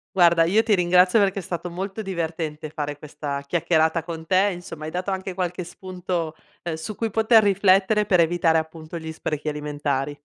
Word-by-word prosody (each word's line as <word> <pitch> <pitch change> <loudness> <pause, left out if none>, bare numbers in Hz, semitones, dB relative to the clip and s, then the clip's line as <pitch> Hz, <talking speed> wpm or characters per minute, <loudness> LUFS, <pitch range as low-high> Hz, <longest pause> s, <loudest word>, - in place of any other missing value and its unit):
Guarda 170 -2 +5
io 205 +6 +3
ti 225 - +2
ringrazio 180 +2 +4
perché 195 -1 +2
è - - -4
stato 175 0 -5
molto 195 +4 -5
divertente 160 -5 -4
fare 145 -1 -4
questa 145 -1 -5
chiacchierata 160 +1 +1
con 165 -1 -7
te, 190 +4 +3
insomma 175 -4 -8
hai 155 - -5
dato 180 +3 -3
anche 190 0 -3
qualche 180 -1 -2
spunto, 175 -2 -4 0.3
ehm, 170 - -3
su 160 +7 -6
cui 225 +1 -2
poter 220 +1 +5
riflettere 200 +1 +3
per 180 -3 +4
evitare 165 -1 +2
appunto 160 +1 -5
gli 160 -1 -6
sprechi 155 -1 -4
alimentari. 145 -1 -3
175 Hz, 180 wpm, -23 LUFS, 160-190 Hz, 0.3 s, Guarda